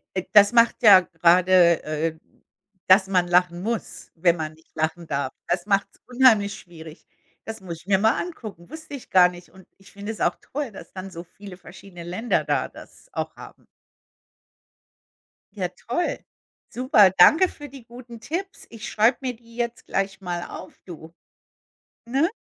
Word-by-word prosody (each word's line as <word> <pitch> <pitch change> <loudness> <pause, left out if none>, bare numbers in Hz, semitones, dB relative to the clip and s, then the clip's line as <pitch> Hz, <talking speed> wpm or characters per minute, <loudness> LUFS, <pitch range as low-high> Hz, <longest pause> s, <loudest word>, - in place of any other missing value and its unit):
Äh, 185 - -1
das 205 -1 +7
macht 235 -1 +3
ja 200 -4 +9
gerade, 175 0 +3
äh, 155 +1 -3 0.7
dass 190 +1 +5
man 180 -2 +1
lachen 175 0 +2
muss, 230 +1 -5
wenn 170 0 +2
man 155 -2 -5
nicht 160 +1 -26
lachen 160 +2 -3
darf. 140 -2 -3
Das 175 0 -1
macht's 200 -1 -1
unheimlich 240 -5 +3
schwierig. 160 -2 -14 0.4
Das 225 0 -7
muss 175 -3 -7
ich 185 - -26
mir 195 - +3
mal 220 +5 +2
angucken, 215 - -9
wusste 315 0 -11
ich 270 - -12
gar 180 -1 +6
nicht. 175 0 -13
Und 190 -1 -18
ich 195 - -19
finde 200 +2 -7
es 220 - -9
auch - - +1
toll, 280 -3 -5
dass 195 - -12
dann 190 0 -7
so 170 -1 -8
viele 195 +1 -13
verschiedene 175 0 -13
Länder 185 +8 -1
da - - -1
das - - -16
auch - - -4
haben. - - -14 1.9
Ja 185 -3 -1 0.2
toll. 295 +9 -1 0.5
Super. 245 - +4
Danke 325 - +6
für 290 - -11
die 270 -2 -13
guten 235 0 -13
Tipps. 375 +9 -6
Ich 230 -1 -8
schreibe 225 +3 +2
mir 255 -2 -4
die 230 0 -19
jetzt 240 -1 -4
gleich 195 0 -3
mal 175 -2 -4
auf, 185 - -11
du, 165 -2 -11 0.9
ne? 270 +8 +1
195 Hz, 170 wpm, -23 LUFS, 175-235 Hz, 1.9 s, ja